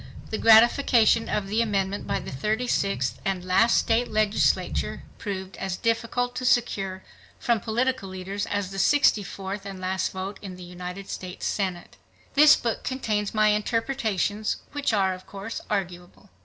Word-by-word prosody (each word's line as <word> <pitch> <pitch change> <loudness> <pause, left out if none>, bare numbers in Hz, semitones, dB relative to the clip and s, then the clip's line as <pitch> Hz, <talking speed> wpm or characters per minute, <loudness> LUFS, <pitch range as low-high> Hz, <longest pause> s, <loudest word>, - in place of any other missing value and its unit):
The 220 - -2
ratification 230 0 +5
of 210 - -1
the 215 +3 +1
amendment 200 -3 -1
by - - 0
the - - -8
36th 195 - -1
and 185 -2 -2
last 205 +6 +4
state 235 +2 +2
legislature 215 -1 0 0.2
proved 190 -3 -5
as 190 -2 -3
difficult 230 +2 -1
to 255 - -3
secure 195 -7 +1 0.3
from 235 -2 +1
political 240 -1 -1
leaders 190 +2 -4
as 205 -2 -2
the 195 - -5
64th 200 -5 +1
and 195 -1 -7
last 185 0 -1
vote 190 +1 -6
in 190 -3 -7
the 180 - -10
United 180 +2 -7
States 180 0 -6
Senate. 185 -4 -3 0.4
This 295 +1 +8
book 230 -2 -3
contains 215 -6 -2
my 215 0 +4
interpretations, 215 -2 0
which 290 -3 -1
are 195 -3 +2
of 185 0 -11
course 200 +3 -6
arguable. 185 -1 -4
205 Hz, 150 wpm, -25 LUFS, 190-230 Hz, 0.4 s, This